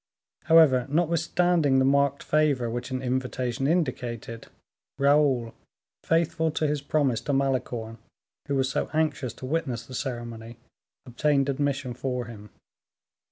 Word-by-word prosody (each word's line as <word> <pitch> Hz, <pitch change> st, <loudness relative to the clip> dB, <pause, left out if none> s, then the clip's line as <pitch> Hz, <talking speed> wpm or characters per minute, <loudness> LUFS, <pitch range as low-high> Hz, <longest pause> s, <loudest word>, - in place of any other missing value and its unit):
However, 155 Hz, -6 st, +5 dB
notwithstanding 165 Hz, -1 st, +2 dB
the 130 Hz, -, +4 dB
marked 140 Hz, 0 st, +2 dB
favor 145 Hz, -6 st, +1 dB
which 120 Hz, +2 st, -4 dB
an 130 Hz, 0 st, -3 dB
invitation 130 Hz, 0 st, -2 dB
indicated, 125 Hz, -8 st, -2 dB, 0.5 s
Raoul, 140 Hz, -5 st, +2 dB, 0.5 s
faithful 165 Hz, 0 st, +1 dB
to 155 Hz, -, 0 dB
his 150 Hz, -1 st, 0 dB
promise 140 Hz, -6 st, 0 dB
to 140 Hz, -, -2 dB
Malicorne, 125 Hz, -4 st, -1 dB, 0.5 s
who 140 Hz, -, -1 dB
was 130 Hz, -1 st, +1 dB
so 135 Hz, -, -2 dB
anxious 150 Hz, -6 st, 0 dB
to 130 Hz, -, -9 dB
witness 130 Hz, -5 st, -2 dB
the 130 Hz, -, -12 dB
ceremony, 120 Hz, -3 st, -5 dB, 0.5 s
obtained 140 Hz, +3 st, +1 dB
admission 140 Hz, -2 st, -1 dB
for 125 Hz, 0 st, -3 dB
him. 105 Hz, -2 st, -11 dB
135 Hz, 125 wpm, -26 LUFS, 120-150 Hz, 0.5 s, However